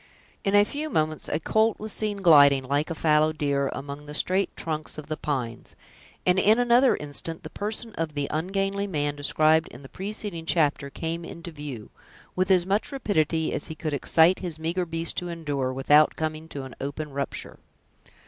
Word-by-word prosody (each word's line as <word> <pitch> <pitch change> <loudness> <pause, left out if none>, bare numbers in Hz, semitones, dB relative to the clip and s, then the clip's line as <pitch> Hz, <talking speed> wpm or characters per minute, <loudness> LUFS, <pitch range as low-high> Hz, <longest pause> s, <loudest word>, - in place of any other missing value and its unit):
In 195 -1 +1
a 205 0 +6
few 300 +7 -4
moments 155 - -1
a 150 - 0
colt 220 +6 +2
was 215 -1 -4
seen 205 -2 -2
gliding, 140 -5 +7
like 145 +4 0
a 165 - -3
fallow 155 0 +3
deer, 140 -2 0
among 145 +1 -7
the 150 - -6
straight 190 +4 +2
trunks 155 -1 -4
of 155 0 -8
the 155 - -1
pines; 130 -7 -4 0.5
and, 180 +1 +4
in 215 +4 +5
another 245 +1 +4
instant, 150 +3 -5
the - - -8
person 215 +2 -4
of 160 -4 -3
the 145 -1 -1
ungainly 195 +5 -1
man, 145 -5 -1
described 155 +2 +3
in 125 - -12
the 135 - -11
preceding 195 -4 -5
chapter, 150 -4 +1
came 165 +3 -4
into 170 +1 -8
view, 145 -8 -8 0.4
with 185 +1 +1
as 180 -2 +4
much 200 +3 0
rapidity 160 - 0
as - - -3
he 160 - -7
could 155 -1 -4
excite 160 +5 +4
his 170 -4 -5
meager 170 +3 -2
beast 165 0 -3
to 175 - -2
endure 145 -6 -2
without 145 +3 +4
coming 155 0 -3
to 140 -4 -6
an 130 -2 -9
open 145 +2 -4
rupture. 140 0 -5
160 Hz, 185 wpm, -26 LUFS, 145-190 Hz, 0.5 s, gliding